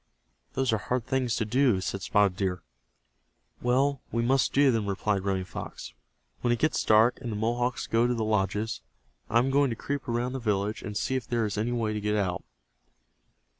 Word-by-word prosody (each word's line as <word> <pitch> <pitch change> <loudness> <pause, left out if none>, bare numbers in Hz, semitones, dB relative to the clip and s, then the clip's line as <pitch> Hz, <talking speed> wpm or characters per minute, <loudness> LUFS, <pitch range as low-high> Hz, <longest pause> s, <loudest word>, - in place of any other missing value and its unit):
"Those 130 -3 +1
are 110 - +1
hard 125 +1 -2
things 130 -3 0
to 110 - -1
do," 125 -2 +3
said 95 +1 -3
Spotted 100 -3 +2
Deer. 90 -3 -2 1.0
"Well, 135 +3 +2
we 115 0 0
must 130 +2 +2
do 140 -1 +4
them," 110 -3 0
replied 100 0 0
Running 95 -1 0
Fox. - - -8 0.5
"When 120 - +1
it 120 - +2
gets 155 +6 +1
dark, 110 +4 +4
and 120 -3 -4
the - - -3
Mohawks 120 +3 -1
go 115 +1 +2
to 125 - 0
the 110 -2 -1
lodges, 105 - 0 0.5
I 115 - +3
am 130 +3 +3
going 140 0 +3
to 115 - -2
creep 140 +4 -4
around 120 +2 -1
the 135 - -3
village 105 -2 -1
and 105 -3 -5
see 130 - -1
if 130 -3 -3
there 115 -2 0
is 105 - -3
any 110 +3 -1
way 115 -3 -1
to 105 - -3
get 105 +1 0
out." 95 -4 -1
115 Hz, 205 wpm, -28 LUFS, 105-125 Hz, 1.0 s, do